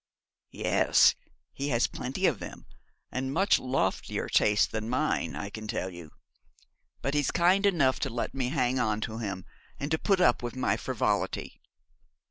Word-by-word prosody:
'Yes, - - +4 0.4
he 140 - -3
has, 120 -4 +2
plenty 135 +10 -3
of 145 - +2
them, - - -9 0.5
and 130 +1 -2
much 190 +7 +3
loftier 130 -7 -1
tastes 105 -1 +4
than 110 0 -4
mine, 125 - 0
I 100 - -5
can 110 +1 -7
tell 95 -2 -3
you. 85 -3 -10 0.9
But 135 - -1
he's 145 -2 +1
kind 190 +4 +3
enough 140 -9 +2
to 135 - -1
let 120 0 -3
me 130 -2 -1
hang 130 -3 +1
on 110 -2 0
to 110 +1 -4
him, 100 -4 -4 0.3
and 140 +2 -4
to 160 - +1
put 195 -3 +2
up 175 -9 +4
with 120 0 -5
my 130 - +1
frivolity. - - -2
130 Hz, 165 wpm, -28 LUFS, 110-145 Hz, 0.9 s, Yes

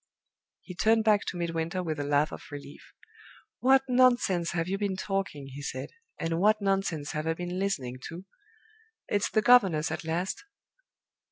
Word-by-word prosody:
He 180 - -9
turned 220 +4 +3
back 210 -2 +3
to 180 - -3
Midwinter 170 +1 -2
with 155 -3 -3
a - - -1
laugh 145 +1 +2
of - - -8
relief. 145 0 -10 0.7
"What 265 +1 +5
nonsense 245 -9 +3
have 170 -1 -1
you 195 +1 -2
been 200 -2 -1
talking!" 195 -8 -3
he 140 - -7
said. 130 -2 -5 0.3
"And 165 0 -1
what 215 +3 +4
nonsense 195 -7 -1
have 155 +1 -3
I 165 - +1
been 180 +1 -4
listening 130 -11 -2
to! 175 +3 -9 0.8
It's 205 -1 0
the 215 - +1
governess 195 -11 +5
at - - -4
last." 175 - -2
180 Hz, 165 wpm, -28 LUFS, 160-205 Hz, 0.8 s, What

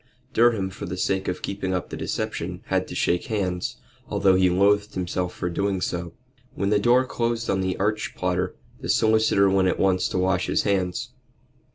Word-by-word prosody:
Durham, 110 -5 +3
for 95 - -7
the 90 +1 -4
sake 95 +1 0
of 90 - -3
keeping 95 -1 -2
up 90 - -4
the - - -4
deception, - - -4
had - - +1
to - - -7
shake 85 0 +1
hands, 90 -5 -2 0.3
although 95 -1 +3
he 95 0 +4
loathed 100 +3 +2
himself 90 0 -2
for - - -4
doing 95 +2 -1
so. 85 -2 -3 0.4
When 100 +1 -1
the 105 - +4
door 120 +4 +4
closed 115 -2 -1
on 95 - +1
the 95 -1 -1
arch 105 +2 -1
plotter 90 0 -1 0.2
the - - -6
solicitor 110 -3 +4
went 95 -1 +3
at - - +1
once 95 -1 +2
to - - -2
wash 90 0 +1
his - - +1
hands. 95 -3 -1
95 Hz, 190 wpm, -24 LUFS, 90-105 Hz, 0.4 s, he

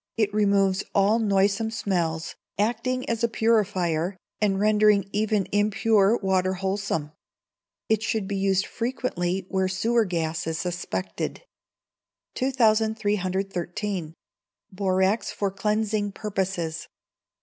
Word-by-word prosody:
it 210 -2 +1
removes 200 -2 +2
all 200 +3 +4
noisome 200 +1 +2
smells, 170 -7 -2 0.2
acting 240 +4 0
as 230 0 -1
a - - +5
purifier, 195 -6 +1 0.2
and 195 -2 +2
rendering 210 -1 +4
even 210 -1 +1
impure 210 +1 +3
water 190 -1 +1
wholesome. 190 -5 -2 0.8
It 220 -1 +2
should 220 -3 -1
be 200 - -2
used 195 0 +1
frequently 195 -7 -2
where 190 -1 +1
sewer 225 +5 +1
gas 165 -3 -2
is 160 0 -2
suspected. 95 - -4 0.9
2313. 205 -7 0 0.6
Borax 190 +2 +1
for 200 -1 -2
Cleansing 210 0 -1
Purposes. 190 -6 -3
200 Hz, 105 wpm, -25 LUFS, 185-215 Hz, 0.9 s, a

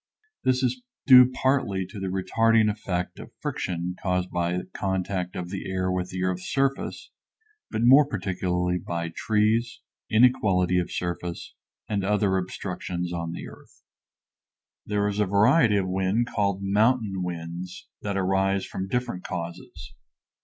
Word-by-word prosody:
This 130 0 +2
is 250 - 0 0.2
due 125 -2 +9
partly 130 -8 0
to 95 +3 -9
the 95 - -3
retarding 110 +4 +2
effect 90 -4 -4
of - - -9
friction 90 0 -3
caused 90 -1 -1
by 90 +1 -1
contact 95 -1 -2
of 90 0 -5
the 95 -1 -5
air 95 0 -1
with 90 0 -2
the 90 0 -3
earth's 90 0 -2
surface, 135 0 -1 0.6
but 110 - -2
more 135 +4 +7
particularly 90 -5 -1
by 85 -1 -4
trees, 110 +2 +1 0.3
inequality 100 -6 +3
of 90 - -3
surface, 85 0 -4 0.3
and 100 -2 -1
other 100 -1 +2
obstructions 90 -1 -4
on 85 -1 -3
the - - -7
earth. - - -16 1.0
There 105 0 +1
is 105 0 -2
a 105 - +2
variety 105 - +4
of 95 -2 0
wind 95 +5 +1
called 100 -2 0
mountain 105 0 +2
winds 90 +1 -6
that 100 -1 -2
arise 95 +1 +1
from 95 - -5
different 120 -4 -2
causes. 85 -1 -7
95 Hz, 140 wpm, -26 LUFS, 90-110 Hz, 1.0 s, due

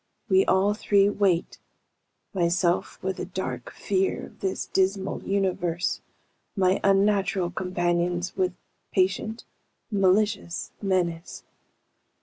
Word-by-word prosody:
We 190 0 +5
all 195 +2 +3
three 200 -2 +3
wait, 195 -4 0 0.7
myself 175 -1 +1
with 190 0 -2
a - - -3
dark 130 -10 -5
fear 190 -1 -1
of - - -17
this 190 -1 -2
dismal 195 0 0
universe, 180 -3 -1 0.5
my 190 -1 +2
unnatural 195 -2 +2
companions 175 -1 -1
with 185 -1 0 0.4
patient, 190 +4 0 0.5
malicious 200 -2 +1
menace. 180 -4 -1
190 Hz, 100 wpm, -26 LUFS, 175-195 Hz, 0.7 s, We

